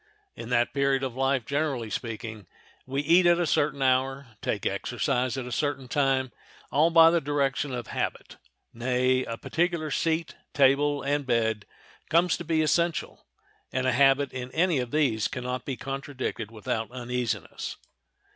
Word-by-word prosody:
In 115 - -8
that 120 -1 +2
period 140 -1 +1
of 130 -3 -2
life, 135 -2 +1
generally 140 -6 -1
speaking, 110 -3 -5 0.4
we 135 +2 -1
eat 175 +4 +5
at 175 0 +5
a 175 - +2
certain 145 -2 +1
hour, 135 +1 +1
take - - -2
exercise 130 0 -1
at 130 - -3
a 125 - -7
certain 135 0 -2
time, 135 -1 +1 0.4
all 155 +4 +4
by 165 -1 +7
the 170 -1 +2
direction 140 -1 0
of 120 -2 -4
habit; - - -4 0.4
nay, 125 +2 +1
a 115 - -5
particular 170 0 -1
seat, 165 0 0 0.2
table, 145 +1 +3
and 140 0 -1
bed 110 -3 0 0.4
comes 170 +1 +3
to - - -6
be 160 -1 +1
essential, 170 +1 0 0.4
and 130 0 -1
a 130 - +3
habit 135 +2 +3
in 125 0 -5
any 170 -3 +2
of 125 -1 -3
these 125 -8 +1
can 125 - -6
not 125 0 -4
be 135 -3 -4
contradicted 135 -5 -4
without 110 0 -3
uneasiness. 125 -2 -4
135 Hz, 160 wpm, -27 LUFS, 125-145 Hz, 0.4 s, by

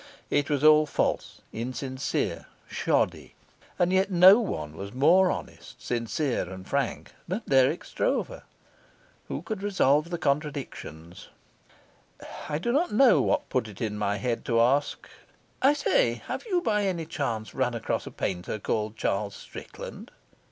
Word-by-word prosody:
It 145 0 +1
was 145 -1 0
all 155 0 +6
false, - - -1
insincere, 130 +3 -3 0.2
shoddy; - - -1 0.4
and 175 +1 +2
yet 190 +1 +3
no 185 +3 +8
one 75 - -4
was 100 +6 -8
more 175 +8 +5
honest, - - -6
sincere, 120 - -2
and 95 0 -9
frank 140 -3 -2 0.2
than 190 +6 -3
Dirk 135 +4 +3
Stroeve. - - -2 0.9
Who - - -5
could 215 -4 -5
resolve 165 -6 +2
the 175 - -2
contradiction? 140 - -3 1.4
I 150 - 0
do 210 +10 -1
not 310 +8 +1
know 245 +4 +5
what 295 0 0
put 130 -4 0
it 105 -3 -11
into 105 -2 -3
my 105 0 0
head 115 +3 -2
to 115 -1 +2
ask: 135 +5 +1 0.5
"I 275 +2 +5
say, - - +2
have - - -5
you 365 -4 +1
by 210 - +1
any 175 -4 -1
chance 120 -9 -3
run 125 -3 0
across 115 - -2
a - - -7
painter 90 +3 -3
called 110 +1 -2
Charles 100 -1 -1
Strickland?" - - -10
140 Hz, 145 wpm, -27 LUFS, 115-185 Hz, 1.4 s, no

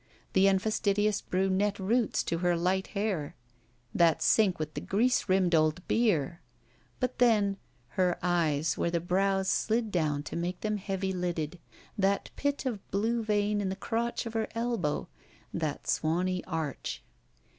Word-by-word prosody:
The 190 +1 +5
unfastidious 205 +1 +1
brunette 195 +2 0
roots 220 +4 +1
to 165 - -2
her 175 -1 +2
light 185 +2 0
hair. 195 -8 -1 0.6
That 170 -2 +3
sink 205 -5 +4
with 155 0 -4
the - - -4
grease 230 +1 +1
rimmed 185 -2 +3
old 155 +2 +2
beer! 175 - +1 0.6
But 255 0 -2
then: 210 -5 +3 0.3
her 180 +4 +1
eyes 160 -4 +1
where - - +1
the 170 0 0
brows 190 +2 +1
slid 225 +1 +1
down 150 -5 0
to - - -7
make 175 +2 -3
them 215 -1 -1
heavy 195 -1 -2
lidded. 175 -2 -3 0.4
That 200 +1 +1
bit 285 -1 -1
of 230 -6 -4
blue 225 +4 0
vein 210 -1 +1
in 195 - -1
the 190 - -2
crotch 230 +4 -2
of 230 - -5
her 225 -1 0
elbow. 230 -10 -1 0.5
That 155 -3 -2
swany 180 +3 0
arch. 160 -5 -4
190 Hz, 150 wpm, -29 LUFS, 170-210 Hz, 0.6 s, The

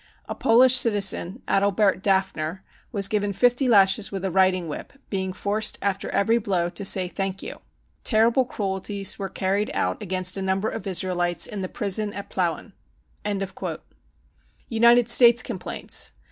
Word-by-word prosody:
A - - -5
Polish 250 +3 +4
citizen, 205 -2 +1
Adalbert 195 -1 +1
Dafner, 190 -3 -1 0.3
was 200 -4 +2
given 205 -1 -1
50 245 +6 +2
lashes 195 -1 +4
with 195 -1 -5
a 190 - -2
riding 185 -1 +2
whip, 150 - -7 0.2
being 190 -2 -2
forced 205 +3 -1
after 195 0 -2
every 225 +3 +1
blow 180 -5 -1
to 200 - -4
say 190 -1 +2
4 - - -16
Thank 195 -1 -3
you.' - - -8 0.4
Terrible 230 +3 +3
cruelties 200 -2 -4
were 195 -1 -4
carried 195 +3 -1
out - - -2
against 185 -1 -1
a - - -4
number 190 +2 -1
of 195 - -7
Israelites 175 -2 0
in 205 -2 -5
the 185 - -4
prison 205 -1 -1
at 200 - -8
Plauen." 180 +3 -3 2.0
United 235 +1 +4
States 235 0 +6
Complaints. 200 -8 -3
195 Hz, 150 wpm, -23 LUFS, 190-215 Hz, 2.0 s, States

